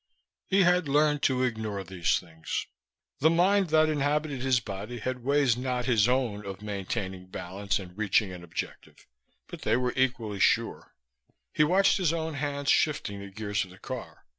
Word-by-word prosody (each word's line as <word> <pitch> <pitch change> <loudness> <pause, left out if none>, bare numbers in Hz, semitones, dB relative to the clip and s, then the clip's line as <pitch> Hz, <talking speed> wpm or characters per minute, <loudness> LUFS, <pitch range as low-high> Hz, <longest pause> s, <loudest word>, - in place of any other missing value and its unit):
He 195 0 +4
had 180 -2 +3
learned 150 +1 +3
to 130 -1 +2
ignore 110 -5 -2
these 90 -2 0
things. 80 -2 -5 0.5
The 160 - +5
mind 185 +4 +3
that 155 0 +4
inhabited 145 -2 0
his 130 -2 +3
body 105 +3 -6
had 125 +2 -4
ways 140 -3 +3
not 125 0 -2
his 115 -2 +3
own 120 -5 0
of 100 0 -7
maintaining 95 -2 -4
balance 95 +2 -3
and 90 -2 -9
reaching 105 -1 +1
an 90 -1 -9
objective, 85 - -7 0.4
but - - -10
they 115 - +2
were 125 -1 0
equally 125 -6 0
sure. - - +1 0.6
He 150 - +4
watched 185 +6 +4
his 175 -5 +1
own 160 -1 -2
hands 145 0 -1
shifting 100 -9 +1
the 100 0 -8
gears 100 0 -2
of 95 - -11
the 90 - -14
car. - - -8
125 Hz, 170 wpm, -28 LUFS, 100-145 Hz, 0.6 s, The